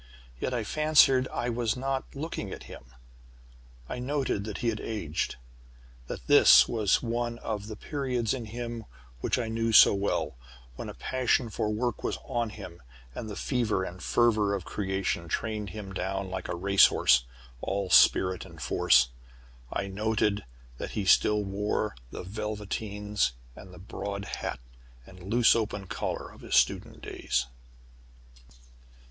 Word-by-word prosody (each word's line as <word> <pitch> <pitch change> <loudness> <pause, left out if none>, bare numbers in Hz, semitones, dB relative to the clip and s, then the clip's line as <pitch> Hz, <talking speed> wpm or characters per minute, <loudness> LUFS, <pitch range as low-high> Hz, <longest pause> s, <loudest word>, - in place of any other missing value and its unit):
Yet - - -2
I 120 -3 -1
fancied 135 0 +4
I 120 - -3
was 115 -1 -1
not 135 +1 -3
looking 140 - -4
at - - -7
him. - - -11 1.0
I 125 - -5
noted 130 -6 -1
that 105 -2 -5
he 120 - 0
had 110 -1 -2
aged 85 -9 -3 0.7
that - - -6
this - - +8
was 110 -2 +1
one 120 0 -2
of 105 -3 -4
the 110 - -6
periods 125 -3 -2
in 125 -4 -4
him 115 0 -6 0.3
which - - 0
I 120 -2 -2
knew 115 0 -1
so 105 - +8
well 100 -10 -1 0.4
when - - -6
a - - -8
passion 130 -2 0
for 105 - -1
work 115 +2 -2
was - - -1
on 120 -2 -1
him, 90 -5 -10 0.3
and 110 - -6
the 105 - -6
fever 115 -7 0
and 90 -1 -7
fervor 110 -4 +2
of 95 - -5
creation 95 -4 -2
trained 105 +4 -2
him 95 0 -7
down 95 0 -3
like 95 -1 -4
a - - -3
race 100 +3 +6
horse, - - +3 0.4
all 95 -1 -2
spirit 90 +2 +5
and 80 -1 -13
force. 65 -2 +4 0.6
I 100 - -2
noted 105 0 0 0.3
that - - -5
he 100 - -1
still 105 +2 +4
wore 105 +2 -2
the - - -7
velveteens 105 - -2 0.2
and 95 - -12
the 90 - -12
broad 100 +2 -5
hat - - -4 0.5
and 90 +4 -14
loose 120 0 +5
open 105 -3 -2
collar - - -4
of - - -16
his - - -2
student - - +1
days. 65 0 -1
105 Hz, 155 wpm, -28 LUFS, 95-115 Hz, 1.0 s, this